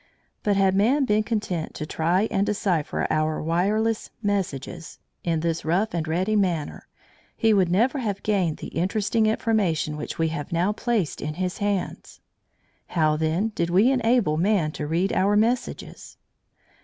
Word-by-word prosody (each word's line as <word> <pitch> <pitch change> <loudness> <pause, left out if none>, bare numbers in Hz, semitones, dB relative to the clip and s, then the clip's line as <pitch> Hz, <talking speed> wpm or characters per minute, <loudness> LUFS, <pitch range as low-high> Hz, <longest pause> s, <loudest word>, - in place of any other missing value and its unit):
But 205 -1 +1
had 195 -1 +3
man 245 +9 +3
been 215 -3 +2
content 205 -7 -3
to 155 - -4
try 175 +7 +1
and 195 - +2
decipher 195 -7 -1
our 155 0 0
wireless 210 +7 0
messages 175 -5 -3 0.3
in 165 -2 0
this 165 0 -1
rough 190 +8 0
and 165 -2 -2
ready 185 +7 0
manner, 175 -7 -1 0.5
he 225 -1 +3
would 190 -4 +3
never 235 - +2
have 205 -6 -3
gained 190 -7 +1
the - - -7
interesting 215 +5 0
information 195 -9 0
which 150 - -6
we 165 0 +1
have 150 -3 -5
now 175 +5 +1
placed 220 - -1
in 150 0 -4
his 185 +1 -3
hands. 205 -2 -3 0.7
How, 155 -3 +2
then, 160 +7 0
did 170 -5 -2
we 200 +9 +4
enable 235 - +2
man 180 -3 +2
to 150 - -5
read 175 +5 0
our 200 +2 +2
messages? 235 +4 -2
190 Hz, 155 wpm, -24 LUFS, 165-215 Hz, 0.7 s, we